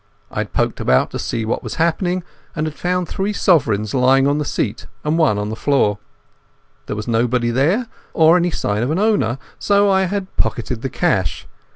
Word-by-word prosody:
I - - -4
had - - -3
poked - - -1
about 65 0 +2
to - - -4
see 115 -1 -2
what 110 - -1
had - - -6
happened, 175 +2 0 0.3
and 155 -1 -1
had 155 - -3
found 180 +2 -1
three 195 +5 -2
sovereigns 110 - +2
lying 135 +1 +4
on 145 +1 +2
the 150 - -2
seat - - -3 0.2
and 150 +1 0
one 155 -11 +3
on 105 0 -2
the 110 - -4
floor. 110 -7 +1 0.9
There - - -3
was 105 +2 -5
nobody 120 +1 +1
there 160 - +2 0.3
or 160 +1 +5
any 175 0 +2
sign 105 -9 -1
of 125 - 0
an 160 - 0
owner, 190 - +1 0.2
so 200 0 +3
I 190 0 +3
had 195 0 -4
pocketed 120 0 -1
the 135 - -3
cash. 110 - -1
145 Hz, 200 wpm, -19 LUFS, 115-180 Hz, 0.9 s, or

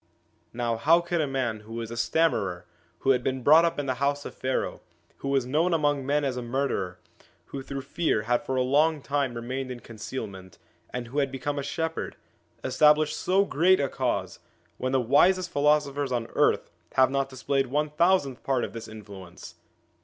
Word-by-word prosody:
Now, 120 -1 -1
how 160 +8 +5
could 170 -1 -1
a 150 - 0
man 130 -5 -2
who 110 +2 -12
was 115 -1 -5
a - - -5
stammerer, 115 - 0 0.4
who 135 - +4
had 125 -2 +2
been 130 -1 -2
brought 155 +5 +7
up 170 - -1
in 145 - -2
the 130 - 0
house 145 +1 0
of - - -6
Pharaoh, 130 0 -2 0.4
who - - -6
was 135 -2 +1
known 160 +7 +2
among 145 -3 +1
men 145 +1 +1
as 130 -2 -2
a - - -2
murderer, 120 -8 -2 0.6
who 135 - -3
through 135 0 -5
fear 140 -5 0
had 120 +2 +1
for 130 - -2
a 130 - +2
long 150 +3 +2
time 140 -4 -1
remained 130 +3 -4
in 125 -1 -6
concealment, 105 -5 -8 0.3
and 120 -1 -5
who 140 +4 -1
had 140 -2 0
become 140 +2 -3
a - - -1
shepherd 160 +3 -3 0.5
establish 150 0 +4
so 195 +2 +2
great 185 +2 +3
a 140 - +1
Cause, 100 -9 -2 0.4
when 130 - -1
the 135 - +3
wisest 175 +9 +3
philosophers 145 -1 +1
on 120 -2 -1
earth - - +2 0.2
have 130 -1 +4
not 135 0 0
dis 130 -1 -11
played 135 -1 +1
one 150 +3 -1
thousandth 155 -5 +2
part 130 -3 0
of - - -4
this 115 -1 -7
influence 100 -5 -11
135 Hz, 195 wpm, -27 LUFS, 120-150 Hz, 0.6 s, brought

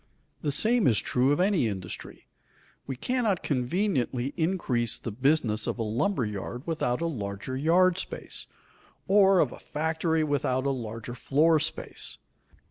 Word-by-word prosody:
The 145 - 0
same 225 - +3
is 115 -4 +4
true 130 +2 +2
of 145 - +1
any 185 - +3
industry. 95 -4 -6 0.6
We 135 - -3
cannot 220 - 0
conveniently 135 - 0
increase 160 - 0
the 115 - -6
business 125 -2 +1
of - - -2
a 115 - -1
lumber 120 - 0
yard 105 +5 -5
without 155 -5 -1
a - - 0
larger 105 -4 -4
yard 175 +6 +3
space, - - -6 0.6
or 195 -1 +5
of 145 -8 +3
a - - -10
factory 160 +1 -1
without 135 -3 0
a 140 - +2
larger 115 -2 -5
floor 155 +6 +3
space. - - -3
140 Hz, 145 wpm, -27 LUFS, 120-170 Hz, 0.6 s, or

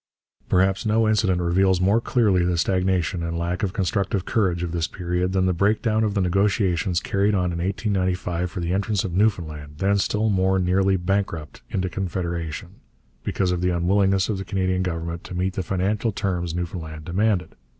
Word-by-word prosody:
Perhaps 95 +1 +2
no 110 +1 +2
incident 105 -4 +2
reveals 90 +2 +2
more 100 +5 +3
clearly 105 -8 +2
the 90 0 +1
stagnation 90 -1 +1
and 85 0 -3
lack 85 +1 -2
of 100 - 0
constructive 100 0 -1
courage 90 -6 +1
of 85 - -3
this 85 -1 -1
period 90 0 -2
than 95 -1 +1
the 90 - +2
break 100 +5 +2
down 110 -2 +2
of 105 -1 0
the 100 - +2
negotiations 95 -2 +1
carried 100 +1 +1
on 90 -2 +1
in 85 - -4
1895 90 -2 -1
for 90 0 -5
the 85 +1 -1
entrance 100 0 0
of 90 - -4
Newfoundland, 80 -7 -1
then 100 +3 +2
still 110 +2 +1
more 95 -1 +2
nearly 95 +1 +2
bankrupt, 90 -6 -2
into 95 -1 -1
Confederation, 85 -4 -4 0.5
because 95 -2 0
of 90 -1 -1
the 90 - +2
unwillingness 95 +2 +2
of 105 -3 -2
the - - -3
Canadian 95 -1 0
Government 85 -1 -3
to 90 - -7
meet 95 +1 -1
the 95 - -2
financial 100 +5 0
terms 90 -5 -2
Newfoundland 80 -3 -5
demanded. 90 -1 0
95 Hz, 180 wpm, -23 LUFS, 85-100 Hz, 0.5 s, more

